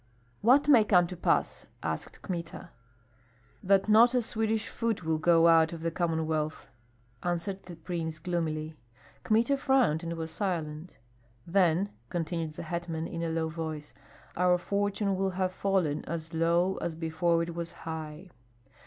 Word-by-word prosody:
"What 265 Hz, +6 st, +5 dB
may 255 Hz, -7 st, +7 dB
come 180 Hz, -4 st, +4 dB
to 180 Hz, -, -7 dB
pass?" 175 Hz, -, 0 dB, 0.2 s
asked -, -, -5 dB
Kmita. 175 Hz, -3 st, -6 dB, 0.9 s
"That 195 Hz, +1 st, +3 dB
not 230 Hz, +4 st, +6 dB
a 245 Hz, -, +2 dB
Swedish 220 Hz, 0 st, -1 dB
foot 225 Hz, -5 st, -2 dB
will 160 Hz, -1 st, 0 dB
go 165 Hz, 0 st, +5 dB
out 165 Hz, 0 st, +5 dB
of 165 Hz, -1 st, -7 dB
the 165 Hz, -, 0 dB
Commonwealth," 160 Hz, -3 st, -2 dB, 0.5 s
answered 175 Hz, +3 st, -2 dB
the 175 Hz, -, -8 dB
prince, 165 Hz, -1 st, -4 dB
gloomily. 155 Hz, -2 st, -3 dB, 0.5 s
Kmita 235 Hz, +6 st, +2 dB
frowned 260 Hz, -, +2 dB
and 170 Hz, -1 st, -4 dB
was 165 Hz, -1 st, -5 dB
silent. 165 Hz, -4 st, -3 dB, 0.5 s
"Then," 180 Hz, +1 st, +2 dB, 0.2 s
continued 165 Hz, -2 st, -3 dB
the -, -, -7 dB
hetman, 165 Hz, -1 st, -4 dB
in 165 Hz, 0 st, -5 dB
a 165 Hz, -, -1 dB
low 160 Hz, 0 st, -1 dB
voice, 155 Hz, -2 st, -6 dB, 0.4 s
"our 180 Hz, 0 st, +3 dB
fortune 200 Hz, +2 st, -1 dB
will 190 Hz, +1 st, 0 dB
have 185 Hz, -1 st, +1 dB
fallen 185 Hz, -7 st, 0 dB
as 165 Hz, 0 st, -5 dB
low 170 Hz, +3 st, +2 dB
as 165 Hz, -, -3 dB
before 165 Hz, +1 st, +1 dB
it 170 Hz, 0 st, -5 dB
was 170 Hz, 0 st, -5 dB
high." 160 Hz, +2 st, -6 dB
170 Hz, 150 wpm, -29 LUFS, 160-195 Hz, 0.9 s, may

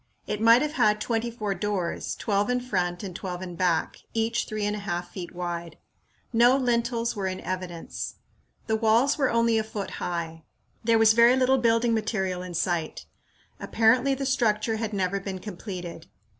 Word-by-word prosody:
It 210 Hz, -, -3 dB
might 230 Hz, +3 st, +6 dB
have 300 Hz, -, -1 dB
had 215 Hz, -7 st, +2 dB
twenty 230 Hz, +1 st, -1 dB
four 215 Hz, -4 st, -3 dB
doors, 195 Hz, -4 st, -2 dB
twelve 205 Hz, 0 st, 0 dB
in 250 Hz, 0 st, +2 dB
front 180 Hz, -7 st, -2 dB
and 185 Hz, -3 st, -6 dB
twelve 180 Hz, -1 st, -5 dB
in 180 Hz, -2 st, -7 dB
back, 170 Hz, -2 st, 0 dB, 0.2 s
each 225 Hz, +1 st, 0 dB
three 215 Hz, -1 st, -3 dB
and 210 Hz, 0 st, 0 dB
a -, -, -5 dB
half 175 Hz, -3 st, -4 dB
feet 180 Hz, -3 st, -7 dB
wide. 170 Hz, -2 st, -5 dB, 0.6 s
No 240 Hz, +3 st, +5 dB
lintels 235 Hz, -2 st, 0 dB
were 195 Hz, -2 st, -2 dB
in 185 Hz, 0 st, -3 dB
evidence. 180 Hz, -2 st, -5 dB, 0.5 s
The 220 Hz, -, +1 dB
walls 230 Hz, +7 st, +3 dB
were 270 Hz, -, +3 dB
only 230 Hz, -1 st, +3 dB
a -, -, 0 dB
foot 210 Hz, -2 st, -5 dB
high. 165 Hz, -2 st, -3 dB, 0.4 s
There 230 Hz, 0 st, +4 dB
was 220 Hz, 0 st, +6 dB
very 235 Hz, +2 st, +6 dB
little 260 Hz, 0 st, +3 dB
building 230 Hz, 0 st, +3 dB
material 195 Hz, -5 st, -1 dB
in 180 Hz, -1 st, -7 dB
sight. 170 Hz, -2 st, -2 dB, 0.5 s
Apparently 245 Hz, +5 st, +3 dB
the 275 Hz, +1 st, -3 dB
structure 225 Hz, -4 st, +1 dB
had 220 Hz, -1 st, -3 dB
never 195 Hz, -1 st, -1 dB
been 195 Hz, -1 st, -5 dB
completed. 180 Hz, -4 st, -7 dB
215 Hz, 175 wpm, -26 LUFS, 185-235 Hz, 0.6 s, might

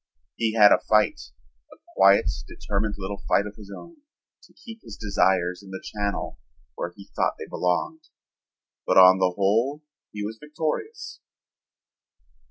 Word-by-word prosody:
He 115 Hz, -1 st, -1 dB
had 105 Hz, -2 st, +7 dB
a -, -, +5 dB
fight, 105 Hz, -1 st, +1 dB, 0.4 s
a -, -, -15 dB, 0.2 s
quiet 100 Hz, +1 st, +5 dB, 0.2 s
determined 105 Hz, +1 st, -3 dB
little 100 Hz, +1 st, -6 dB
fight 100 Hz, -, +2 dB
of 105 Hz, 0 st, -8 dB
his 105 Hz, -2 st, -13 dB
own, 335 Hz, -, -11 dB, 0.4 s
to -, -, -21 dB
keep 225 Hz, -2 st, -13 dB
his 105 Hz, -, -11 dB
desires 95 Hz, -3 st, +1 dB
in 100 Hz, -, -14 dB
the 95 Hz, 0 st, -6 dB
channel 100 Hz, -2 st, -4 dB, 0.3 s
where 85 Hz, -, -5 dB
he 100 Hz, -1 st, -15 dB
thought -, -, 0 dB
they -, -, -7 dB
belonged, 90 Hz, -, -2 dB, 0.8 s
but -, -, +2 dB
on 95 Hz, 0 st, +8 dB
the 90 Hz, -1 st, +2 dB
whole 115 Hz, +10 st, +1 dB, 0.3 s
he 105 Hz, -1 st, -5 dB
was 110 Hz, +1 st, -7 dB
victorious. 150 Hz, +1 st, -5 dB
105 Hz, 150 wpm, -24 LUFS, 95-110 Hz, 0.8 s, on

